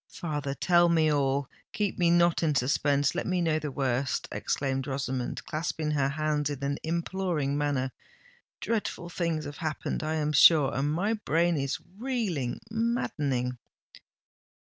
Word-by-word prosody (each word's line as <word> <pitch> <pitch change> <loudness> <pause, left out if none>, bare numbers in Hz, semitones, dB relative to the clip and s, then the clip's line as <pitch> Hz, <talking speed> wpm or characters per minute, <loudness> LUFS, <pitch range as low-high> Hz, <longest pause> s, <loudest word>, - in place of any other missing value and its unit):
"Father, 145 -5 -4
tell 175 +2 +4
me 160 -2 +3
all—keep 140 +9 -2
me 175 -1 +4
not 170 0 +4
in 155 -3 +1
suspense—let 140 +4 +1
me 185 -1 +1
know 160 -2 +1
the 150 -1 -4
worst!" 135 -1 -1
exclaimed 135 -1 -2
Rosamond, 130 -2 -3
clasping 155 -1 -2
her 140 -2 +1
hands 150 0 0
in 140 -2 -5
an 140 +1 -1
imploring 170 -3 -1
manner. 145 -3 0 0.7
"Dreadful 210 -6 -2
things 170 -3 -2
have 145 - -7
happened, 155 -3 -3
I 155 0 -1
am 150 -1 0
sure—and 145 -2 +5
my 195 +8 0
brain 170 -5 +1
is 140 -2 -1 0.2
reeling, 215 - -2
maddening!" 145 - -1
150 Hz, 135 wpm, -28 LUFS, 140-170 Hz, 0.7 s, sure—and